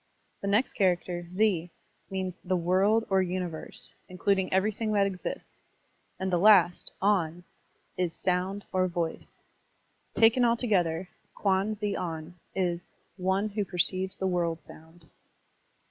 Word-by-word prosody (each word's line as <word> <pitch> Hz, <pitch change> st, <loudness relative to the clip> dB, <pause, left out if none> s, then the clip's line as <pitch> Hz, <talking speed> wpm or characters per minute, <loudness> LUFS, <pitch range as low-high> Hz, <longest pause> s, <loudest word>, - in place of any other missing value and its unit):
The 200 Hz, -, -3 dB
next 210 Hz, +6 st, +2 dB
char 185 Hz, -4 st, +4 dB
acter, 175 Hz, 0 st, -6 dB
ze, 180 Hz, -3 st, +1 dB, 0.4 s
means 190 Hz, -2 st, -3 dB
the 185 Hz, 0 st, 0 dB
"world" 190 Hz, +6 st, +3 dB
or 190 Hz, 0 st, +4 dB
"universe," 180 Hz, -3 st, -5 dB, 0.2 s
including 190 Hz, +1 st, 0 dB
everything 215 Hz, +3 st, +1 dB
that 200 Hz, -1 st, +4 dB
exists; 190 Hz, -2 st, -5 dB, 0.6 s
and 190 Hz, 0 st, -1 dB
the 175 Hz, -, +3 dB
last, 185 Hz, -3 st, +5 dB
on, 175 Hz, -4 st, +1 dB, 0.5 s
is 180 Hz, -2 st, 0 dB
"sotmd" 185 Hz, +2 st, -1 dB
or 185 Hz, 0 st, +2 dB
"voice." 170 Hz, -2 st, -4 dB, 0.7 s
Taken 230 Hz, +2 st, +5 dB
altogether, 195 Hz, -8 st, +1 dB, 0.3 s
Kwan 200 Hz, +2 st, +1 dB
ze 205 Hz, -1 st, -2 dB
on 160 Hz, -1 st, -4 dB, 0.2 s
is 175 Hz, -2 st, 0 dB, 0.4 s
"one 190 Hz, +3 st, 0 dB
who 205 Hz, 0 st, -1 dB
perceives 185 Hz, 0 st, -1 dB
the 190 Hz, -, -3 dB
world 170 Hz, -3 st, 0 dB
sotmd." 160 Hz, +2 st, -15 dB
185 Hz, 130 wpm, -28 LUFS, 175-200 Hz, 0.7 s, last